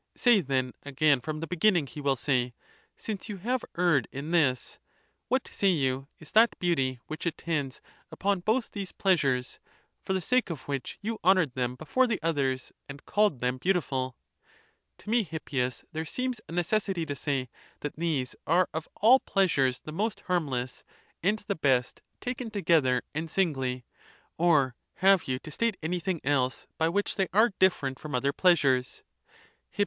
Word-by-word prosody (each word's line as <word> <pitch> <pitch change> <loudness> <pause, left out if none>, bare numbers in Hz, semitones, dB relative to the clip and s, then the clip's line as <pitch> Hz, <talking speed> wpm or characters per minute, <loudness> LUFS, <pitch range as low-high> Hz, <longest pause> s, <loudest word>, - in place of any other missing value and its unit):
Say 240 -5 +5
then 130 -4 -1
again 145 -1 +2
from 155 +4 -4
the - - -2
beginning, 180 -2 +3
he 140 +3 -9
will 140 -1 +2
say, 125 -2 0 0.4
since 215 0 -5
you 205 - -4
have 245 +7 -1
erred 170 -9 +3
in 140 +4 -5
this, 140 -8 +1 0.5
what, 260 0 0
say 200 - 0
you, 135 -6 +1
is 160 - -12
that 225 +1 +5
beauty, 135 -8 0
which 155 +2 -5
(attends) 155 -5 -2 0.3
upon 200 -1 0
both 220 +7 0
these 195 -3 -5
pleasures, 135 -10 +1 0.4
for 190 - -1
the 190 - +1
sake 250 +3 +1
of 155 -6 -5
which 140 -2 -4
you 225 +1 -3
honoured 180 -7 +4
them 125 0 -2
before 205 - +1
the 225 -4 -1
others, 135 -6 0 0.2
and 135 0 -10
called 205 - +2
them 125 +1 0
beautiful? 135 -8 0 0.8
[54.] - - -19
To - - -9
me, 235 0 +4
Hippias, 140 - -3
there 160 -1 -3
seems 250 +5 -3
a - - -8
necessity 175 0 0
to 145 -2 -4
say, 135 -2 -2 0.3
that 150 - -4
these 155 -6 -1
are 175 +3 +3
of 160 0 -4
all 245 +5 +7
pleasures 140 - +1
the 155 - -8
most 210 +5 -2
harmless,? 135 -8 -2 0.4
and 205 +5 +2
the 200 - +1
best, 130 -7 +1 0.2
taken 250 -1 -4
together 160 - +2
and 160 +2 -3
singly. 130 -9 -1 0.5
Or 150 -7 +3 0.2
have 195 -1 +4
you 130 -1 0
to 150 - -10
state 230 +5 0
any 175 +3 -1
thing 175 -1 -2
else, 130 -2 0
by 160 0 +3
which 200 +5 -1
they 195 -2 +2
are 215 +1 +4
different 140 -8 +2
from 150 -3 -5
other 140 +3 +1
pleasures? 140 -9 +2 0.7
Hip. - - -21
160 Hz, 170 wpm, -28 LUFS, 135-195 Hz, 0.8 s, all